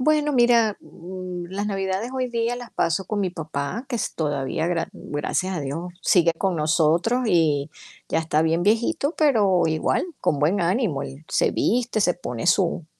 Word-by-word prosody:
Bueno, 300 +2 +2
mira, 235 -4 +4
mm, 180 0 -8
las 200 +2 -3
navidades 195 +3 -2
hoy 255 -1 -1
día 235 0 0
las 245 -1 -9
paso 190 +3 0
con 210 +3 -3
mi 190 -3 0
papá, 160 - -4
que 245 - -2
es - - -3
todavía, 145 +1 -1
gra 170 -2 0
mm, - - -12
gracias 185 +5 -1
a 160 - -2
Dios, 165 +6 -5
sigue 170 -3 +4
con 190 -2 0
nosotros, 165 +9 +2
y 155 -7 +2 0.4
ya - - +1
está 160 -1 +1
bien 165 +1 +1
viejito, 235 - +1
pero 210 - +3
igual, 160 - 0
con 145 - +1
buen 170 +7 +2
ánimo, 175 - 0
él 135 +4 -9
se - - +1
viste, 240 -1 0
se 180 -3 +3
pone 125 -9 -5
su 175 -2 +2
185 Hz, 180 wpm, -23 LUFS, 160-230 Hz, 0.4 s, mira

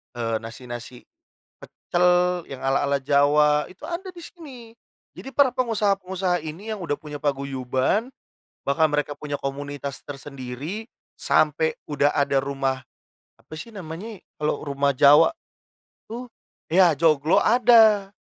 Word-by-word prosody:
eee, 115 -2 -1
nasi-nasi 120 +1 -9 0.5
pecel 175 0 -2 0.4
yang 135 - -8
ala-ala 140 +1 +1
Jawa, 150 +1 +3
itu 185 - -17
ada 350 +3 -5
di 350 -1 -11
sini. 295 -9 -11 0.5
Jadi, - - -9
para 280 -3 +4
pengusaha-pengusaha 195 -7 0
ini 170 +8 -7
yang 215 - -4
udah 165 -5 -2
punya 150 -1 -8
paguyuban, 135 - -1 0.6
bahkan 155 +3 +2
mereka 145 0 -1
punya 145 -1 -5
komunitas 140 0 -5
tersendiri 140 - -7 0.3
sampai 155 +1 +2 0.2
udah 145 0 +2
ada 140 -1 +1
rumah, 135 -1 -2 0.6
apa - - -27
sih 230 - -8
namanya 190 +4 -7 0.2
kalau 150 0 -1
rumah 140 -1 0
Jawa 145 +4 +7 0.8
itu? 240 +3 -7 0.4
Ya, 175 -2 +5
joglo 155 +5 +3
ada, 220 -5 +5
150 Hz, 120 wpm, -24 LUFS, 140-195 Hz, 0.8 s, Jawa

